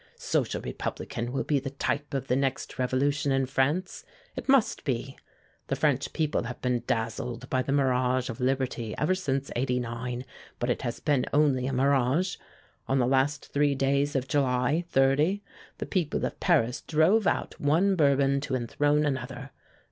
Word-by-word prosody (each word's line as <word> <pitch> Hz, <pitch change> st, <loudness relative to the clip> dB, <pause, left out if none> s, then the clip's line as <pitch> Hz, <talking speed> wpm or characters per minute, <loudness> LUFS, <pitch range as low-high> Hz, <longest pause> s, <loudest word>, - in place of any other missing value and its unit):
Social -, -, -1 dB
Republican 120 Hz, +1 st, -4 dB
will 135 Hz, -, -1 dB
be 145 Hz, -2 st, +1 dB
the 135 Hz, +1 st, -5 dB
type 140 Hz, +1 st, -2 dB
of 135 Hz, -1 st, -2 dB
the 125 Hz, -, +1 dB
next 135 Hz, -1 st, -2 dB
revolution 140 Hz, +3 st, +1 dB
in 135 Hz, 0 st, +2 dB
France 145 Hz, +8 st, -1 dB, 0.3 s
it -, -, -7 dB
must 270 Hz, -4 st, +3 dB
be. 135 Hz, 0 st, -2 dB, 0.5 s
The -, -, 0 dB
French -, -, +1 dB
people 155 Hz, -6 st, -1 dB
have 125 Hz, +1 st, -6 dB
been 125 Hz, -1 st, 0 dB
dazzled 115 Hz, +3 st, -2 dB
by 130 Hz, -, +2 dB
the 130 Hz, -, -3 dB
mirage 130 Hz, -2 st, +2 dB
of 115 Hz, -, -6 dB
liberty 125 Hz, -3 st, -1 dB
ever 155 Hz, +5 st, +2 dB
since 140 Hz, -7 st, -2 dB
'89, 125 Hz, 0 st, -2 dB, 0.3 s
but 120 Hz, +1 st, 0 dB
it -, -, -2 dB
has 120 Hz, -2 st, -3 dB
been 145 Hz, -4 st, +1 dB
only 140 Hz, -4 st, +2 dB
a -, -, -1 dB
mirage. 140 Hz, +7 st, +2 dB, 0.5 s
On 135 Hz, -, +1 dB
the 125 Hz, -, +3 dB
last 135 Hz, +3 st, 0 dB
three 145 Hz, -1 st, +2 dB
days 140 Hz, +2 st, +1 dB
of 135 Hz, -1 st, 0 dB
July, 135 Hz, +4 st, +1 dB
'30, 145 Hz, +9 st, +2 dB, 0.3 s
the -, -, -4 dB
people 175 Hz, -6 st, -1 dB
of -, -, -5 dB
Paris 140 Hz, -8 st, +2 dB
drove 175 Hz, +7 st, +3 dB
out -, -, -1 dB
one 170 Hz, +7 st, +3 dB
Bourbon 140 Hz, -3 st, +3 dB
to 135 Hz, -, -2 dB
enthrone 145 Hz, +5 st, +1 dB
another. 135 Hz, -1 st, -4 dB
135 Hz, 165 wpm, -28 LUFS, 125-145 Hz, 0.5 s, must